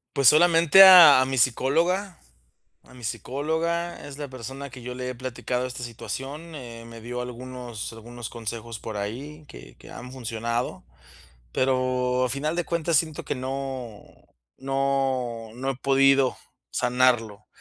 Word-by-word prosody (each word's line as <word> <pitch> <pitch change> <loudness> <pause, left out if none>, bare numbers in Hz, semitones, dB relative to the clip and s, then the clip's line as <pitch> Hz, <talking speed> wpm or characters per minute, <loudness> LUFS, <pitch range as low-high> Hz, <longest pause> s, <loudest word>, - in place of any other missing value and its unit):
Pues, 140 -2 +4
solamente 170 +4 +7
a 170 -9 +9
mi 135 0 -2
psicóloga 170 - +1 0.6
a - - -19
mi 125 - -14
psicóloga, 160 +9 -3
es 140 -1 -9
la 145 -1 -6
persona 135 +2 -8
que 130 0 -11
yo 125 +1 -7
le 125 0 -5
he 125 - -4
platicado 125 0 -3
esta 125 0 -7
situación. 135 +8 -7
Eh, 120 -5 -9
me 115 0 -11
dio 120 +2 -5
algunos 125 -2 -7
algunos 115 +1 -9
consejos 115 0 -6
por 110 -2 -6
ahí 135 +10 -6
que - - -13
que - - -15
han 125 +1 -10
funcionado, 115 -1 -4 0.7
pero 130 -1 +1
a - - 0
final 145 +5 -2
de 175 - -1
cuentas 170 -1 0
siento 155 0 0
que - - -3
no 130 -4 -5 0.6
no 135 -4 -1
no 130 +3 -3
he 135 - -4
podido 135 0 +3 0.3
sanarlo, 120 -4 +1
130 Hz, 145 wpm, -25 LUFS, 120-140 Hz, 0.7 s, a